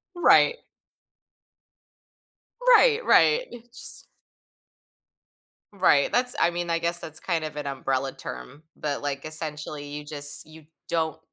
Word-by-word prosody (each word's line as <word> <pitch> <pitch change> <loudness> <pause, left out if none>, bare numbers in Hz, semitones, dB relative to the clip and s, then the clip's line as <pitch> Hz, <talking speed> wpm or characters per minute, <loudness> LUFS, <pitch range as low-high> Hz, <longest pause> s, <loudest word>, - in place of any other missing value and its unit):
Right. 475 +7 +3 2.2
Right, 480 -1 +1
right. - - +2
It 240 0 -13
just - - -5 1.7
Right, 165 -7 +1
that's 250 0 +7
I 170 - +2
mean, 175 0 -6
I 165 0 -1
guess 170 +1 +2
that's 160 0 +3
kind 165 -3 -4
of 155 -1 -8
an 145 -1 -6
umbrella 135 0 -4
term, 130 - -11
but, 145 -2 -5
like, 140 0 -6
essentially 150 -1 +2
you 145 +1 -9
just 145 -1 +4
you 155 -1 -17 0.2
don't 160 -1 -3
155 Hz, 125 wpm, -23 LUFS, 145-175 Hz, 2.2 s, that's